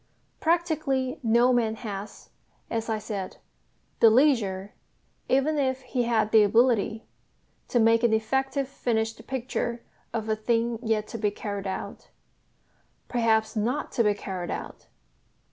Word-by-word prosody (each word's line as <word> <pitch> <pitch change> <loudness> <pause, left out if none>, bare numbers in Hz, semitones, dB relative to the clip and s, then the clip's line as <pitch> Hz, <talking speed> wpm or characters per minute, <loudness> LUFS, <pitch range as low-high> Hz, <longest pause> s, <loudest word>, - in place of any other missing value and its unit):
Practically 310 -5 0
no 240 +1 +4
man 225 -2 +1
has, 205 -3 -8 0.4
as 230 0 -2
I 220 - 0
said, 205 -3 -5 0.6
the 230 - +8
leisure, 215 -7 +2 0.6
even 285 +3 +2
if 260 -1 0
he 250 -1 -1
had 220 -2 +1
the 220 - +7
ability, 225 0 +2 0.6
to 240 - +1
make 225 0 +4
an 235 -2 +3
effective 265 +5 0
finished 225 -4 -2
picture 240 -2 -3 0.3
of 220 -1 -3
a 220 - +1
thing 230 +1 0
yet 220 -3 0
to 230 - -6
be 210 -1 +2
carried 200 -1 -5
out 190 - -6 1.0
perhaps 220 -2 +1
not 240 +7 -1
to 235 - +2
be 210 -1 +2
carried 185 -3 -5
out. - - -6
230 Hz, 135 wpm, -26 LUFS, 215-255 Hz, 1.0 s, the